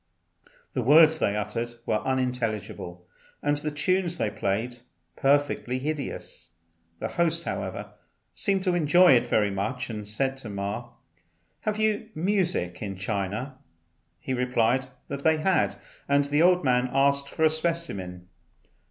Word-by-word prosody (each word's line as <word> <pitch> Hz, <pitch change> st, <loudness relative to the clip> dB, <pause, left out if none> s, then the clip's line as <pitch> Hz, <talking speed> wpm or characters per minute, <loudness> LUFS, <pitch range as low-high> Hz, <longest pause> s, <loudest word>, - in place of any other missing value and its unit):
The -, -, 0 dB
words 155 Hz, +4 st, +6 dB
they 100 Hz, -, +1 dB
uttered 115 Hz, +3 st, -3 dB
were 105 Hz, -, +1 dB
unintelligible, 115 Hz, -9 st, -3 dB, 0.4 s
and 145 Hz, 0 st, +2 dB
the 150 Hz, +1 st, -3 dB
tunes 175 Hz, +3 st, 0 dB
they 105 Hz, -, 0 dB
played 110 Hz, +5 st, -2 dB, 0.4 s
perfectly 140 Hz, -2 st, +1 dB
hideous. 145 Hz, -, -5 dB, 0.4 s
The -, -, -3 dB
host, 170 Hz, -1 st, 0 dB
however, -, -, -4 dB, 0.4 s
seemed 195 Hz, -3 st, 0 dB
to 185 Hz, -2 st, +1 dB
enjoy 175 Hz, +2 st, +5 dB
it 125 Hz, -3 st, +4 dB
very 105 Hz, -2 st, +2 dB
much, 125 Hz, +6 st, -3 dB
and 105 Hz, -2 st, -6 dB
said 135 Hz, +6 st, -1 dB
to 120 Hz, -5 st, -7 dB
Ma, 100 Hz, +4 st, -4 dB, 0.7 s
"Have 215 Hz, -1 st, -2 dB
you 215 Hz, 0 st, 0 dB
music 175 Hz, -, 0 dB
in 100 Hz, -2 st, -4 dB
China?" 105 Hz, +7 st, -3 dB, 0.6 s
He 130 Hz, -, -3 dB
replied 125 Hz, 0 st, +1 dB, 0.2 s
that 140 Hz, 0 st, -5 dB
they 160 Hz, +2 st, +3 dB
had, 185 Hz, +4 st, +2 dB, 0.3 s
and 140 Hz, 0 st, +4 dB
the 145 Hz, +2 st, +1 dB
old 180 Hz, +1 st, +5 dB
man 125 Hz, -1 st, +2 dB
asked 140 Hz, +1 st, +3 dB
for 160 Hz, -, -2 dB
a -, -, +6 dB
specimen. 155 Hz, -, -3 dB
135 Hz, 140 wpm, -26 LUFS, 110-160 Hz, 0.7 s, words